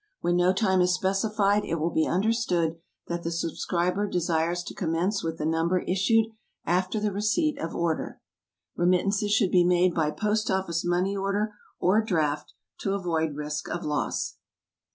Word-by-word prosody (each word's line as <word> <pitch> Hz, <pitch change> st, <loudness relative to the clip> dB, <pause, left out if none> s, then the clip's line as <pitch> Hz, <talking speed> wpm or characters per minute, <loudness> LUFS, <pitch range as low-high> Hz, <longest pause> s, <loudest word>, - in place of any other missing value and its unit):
When 175 Hz, 0 st, +1 dB
no 180 Hz, +1 st, +4 dB
time 190 Hz, -2 st, +2 dB
is 180 Hz, 0 st, +3 dB
specified, 200 Hz, +2 st, +1 dB
it -, -, -2 dB
will 165 Hz, +1 st, -1 dB
be 160 Hz, -, +1 dB
understood 180 Hz, -5 st, +1 dB, 0.3 s
that 170 Hz, 0 st, -3 dB
the 170 Hz, -, -3 dB
subscriber 175 Hz, +3 st, -1 dB
desires 170 Hz, -1 st, 0 dB
to -, -, -7 dB
commence 180 Hz, +4 st, -1 dB
with 165 Hz, 0 st, -3 dB
the 150 Hz, -, -3 dB
Number 165 Hz, +3 st, +1 dB
issued 215 Hz, +5 st, +2 dB, 0.4 s
after 185 Hz, +4 st, +1 dB
the 210 Hz, 0 st, 0 dB
receipt 215 Hz, -, 0 dB
of 165 Hz, -, -4 dB
order. 170 Hz, -2 st, -2 dB, 0.6 s
Remittances 195 Hz, +4 st, +2 dB
should 210 Hz, -3 st, +3 dB
be 180 Hz, -1 st, +5 dB
made 180 Hz, 0 st, +3 dB
by 155 Hz, -3 st, +1 dB
POST 215 Hz, +6 st, -1 dB
OFFICE 190 Hz, -4 st, 0 dB
MONEY 180 Hz, +3 st, +1 dB
ORDER 200 Hz, +2 st, -1 dB, 0.3 s
or 195 Hz, +5 st, +3 dB
DRAFT, 155 Hz, -8 st, -1 dB, 0.2 s
to 195 Hz, 0 st, -1 dB
avoid 160 Hz, -5 st, -1 dB
risk 150 Hz, +1 st, -4 dB
of 175 Hz, -, -4 dB
loss. 150 Hz, -1 st, -2 dB
180 Hz, 160 wpm, -27 LUFS, 165-200 Hz, 0.6 s, be